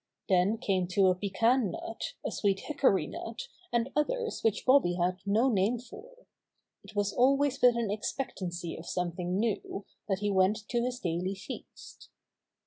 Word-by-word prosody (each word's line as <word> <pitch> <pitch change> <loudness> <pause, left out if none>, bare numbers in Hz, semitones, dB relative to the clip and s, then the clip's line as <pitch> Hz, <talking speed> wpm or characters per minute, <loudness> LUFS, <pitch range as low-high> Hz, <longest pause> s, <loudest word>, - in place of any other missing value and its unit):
Then 190 +4 +3
came 190 -6 0
to 195 -1 +5
a 185 - +3
pecan 210 +5 +2
nut, 225 - -5
a - - -1
sweet 195 -2 0
hickory 275 -10 +2
nut - - -6 0.2
and 235 +2 0
others 455 +10 -1
which 220 -2 +1
Bobby 255 -10 +5
had 180 +1 0
no 220 +6 +3
name 220 0 +2
for. 455 - -13 0.6
It - - -14
was 205 -1 0
always 275 +2 +3
with 245 -1 +6
an 225 -4 0
expectancy 185 -7 -4
of 165 - -10
something 180 +1 -2
new 210 -2 -2 0.2
that 195 - +2
he 205 +1 -1
went 200 +3 +2
to 240 - +1
his 250 0 -2
daily 180 +3 -2
feast. 190 - -10
210 Hz, 160 wpm, -30 LUFS, 185-250 Hz, 0.6 s, with